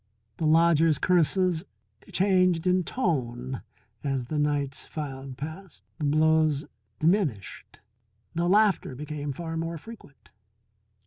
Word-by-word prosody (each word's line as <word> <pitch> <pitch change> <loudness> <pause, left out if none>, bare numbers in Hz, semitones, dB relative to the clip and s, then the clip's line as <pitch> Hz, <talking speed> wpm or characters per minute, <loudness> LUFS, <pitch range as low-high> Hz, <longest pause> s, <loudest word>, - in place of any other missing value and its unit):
The 160 - 0
lodger's 165 -1 +4
curses 180 0 +2 0.5
changed 185 -3 +3
in 185 0 +3
tone 130 - -2 0.4
as 135 -3 -1
the 150 +4 -2
nights 145 -2 -1
filed 135 -3 -6
past, 160 +6 -8 0.2
the 150 - -1
blows 155 0 +3 0.3
diminished, 155 - -1 0.5
the 170 +1 0
laughter 205 -8 +3
became 145 +1 -5
far 165 +3 -5
more 165 +1 -3
frequent. 145 - -14
155 Hz, 110 wpm, -27 LUFS, 140-175 Hz, 0.5 s, lodger's